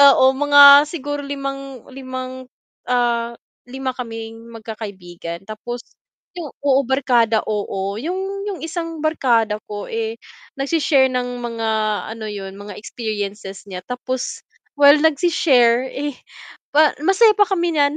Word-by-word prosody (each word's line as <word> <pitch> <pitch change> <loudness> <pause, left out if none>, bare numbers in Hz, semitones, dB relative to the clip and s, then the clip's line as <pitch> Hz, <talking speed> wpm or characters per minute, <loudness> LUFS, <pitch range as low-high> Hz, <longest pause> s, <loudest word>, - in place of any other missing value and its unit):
Oo 260 0 +5
mga 285 0 +8
siguro 290 -2 -4
5, 275 -2 -6
5, 255 -1 -7 0.4
ah, 235 -1 +1 0.3
5 265 +1 -4
kaming 225 -2 -7
magkakaibigan 190 -7 -8
tapos 240 +3 -6 0.5
yung 350 -4 -7 0.2
oo, 275 -1 +4
barkada 245 -4 +2
oo 200 -1 -3
yung 385 - -4
yung 395 -3 -4
1 330 -1 -5
barkada 235 -9 +1
ko 205 -1 -6
eh, 225 0 -2 0.4
nagshe-share 275 -2 +2
ng 245 -1 -3
mga, 230 -1 -3 0.5
ano 225 - -9
yun, 195 -1 -7
mga 205 0 -9
experiences 205 -3 -5
niya 180 -2 -7
tapos 255 +2 -4 0.4
while 285 0 +8
nagsi-share, 265 -6 +3
eh, 290 0 -4 0.6
pa 300 +1 +4
masaya 425 +5 +5
pa 420 - +5
kami 345 -4 0
niyan. 285 -1 +3
255 Hz, 125 wpm, -20 LUFS, 225-290 Hz, 0.6 s, mga